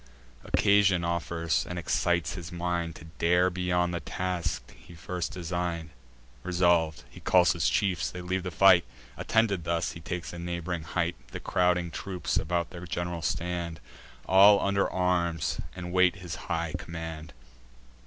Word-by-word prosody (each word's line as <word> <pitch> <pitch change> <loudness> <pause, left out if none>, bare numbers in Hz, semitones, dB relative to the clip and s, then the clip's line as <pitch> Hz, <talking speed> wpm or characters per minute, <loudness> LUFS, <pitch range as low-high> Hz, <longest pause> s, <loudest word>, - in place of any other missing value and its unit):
Occasion 100 -3 +3
offers, 85 -1 0
and 90 - -4
excites 85 0 0
his 90 -1 -7
mind 85 -1 -2
To 80 - -11
dare 90 +2 +3
beyond 90 -1 0
the 85 - -1
task 90 +2 -3
he 85 - -15
first 90 +2 -4
design'd. 85 -3 -3 0.5
Resolv'd, 85 -3 +2
he - - -12
calls 90 -1 +4
his 85 +1 +1
chiefs; 95 -5 +1
they 90 - -8
leave 90 +1 -2
the 90 - -4
fight: 90 0 +6 0.3
Attended 110 -6 +1
thus, 85 0 -1
he 85 - -9
takes 90 +2 -5
a 85 - -7
neighb'ring 85 0 -3
height; 85 +1 -1
The - - -7
crowding 90 -1 +1
troops 90 +1 -3
about 85 +1 -1
their 90 0 -8
gen'ral 85 0 -3
stand, 85 -1 -2 0.5
All 100 +2 +7
under 100 0 +1
arms, 85 -4 0 0.2
and 90 -1 -6
wait 90 0 +4
his 90 -4 -7 0.2
high 85 -1 -1
command. 80 -2 -7
85 Hz, 150 wpm, -28 LUFS, 85-90 Hz, 0.5 s, All